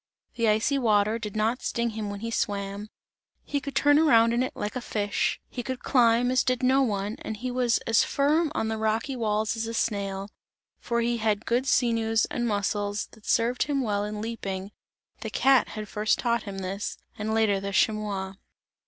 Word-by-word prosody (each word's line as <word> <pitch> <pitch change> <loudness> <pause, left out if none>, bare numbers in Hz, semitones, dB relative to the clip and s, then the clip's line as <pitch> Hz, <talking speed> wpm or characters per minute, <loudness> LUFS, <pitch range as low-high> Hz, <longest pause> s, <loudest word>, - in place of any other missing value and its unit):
The 230 -2 0
icy 220 +6 +2
water 215 -2 +2
did 210 -2 -6
not 225 +4 0
sting 235 -1 -1
him 215 -1 -4
when 200 0 -6
he 230 0 -4
swam, 200 -1 -2 0.5
he 285 -1 -2
could 280 -1 -7
turn 290 +1 +5
around 230 -7 +5
in 240 - +1
it 255 - -2
like 210 +3 -4
a 255 - -2
fish; 205 -3 -1
he 245 - -5
could 260 +1 -5
climb 245 -1 +3
as 255 0 +3
did 255 0 0
no 265 +2 +4
one, 205 -3 -1
and 220 - -5
he 255 +3 -4
was 245 -2 +2
as 225 0 +4
firm 300 +3 +1
on 220 - 0
the 220 0 -2
rocky 220 +5 0
walls 215 -2 0
as 225 0 -3
a 230 - -4
snail 200 -3 -2 0.5
for 235 0 -1
he 235 0 0
had 215 -1 0
good 245 +3 0
sinews 225 -3 +2
and 240 -1 -1
muscles 205 0 -1
that 220 - -17
served 235 +2 +1
him 280 -1 0
well 205 -3 0
in 210 0 -4
leaping 200 -4 -5 0.5
the 220 - -5
cat 265 +4 +4
had 215 0 -5
first 210 +1 +1
taught 235 -2 0
him 195 - -6
this, 195 +2 -4 0.2
and 215 +1 -1
later 215 -3 +2
the 200 0 -4
chamois. 200 -2 0
225 Hz, 195 wpm, -26 LUFS, 210-245 Hz, 0.5 s, turn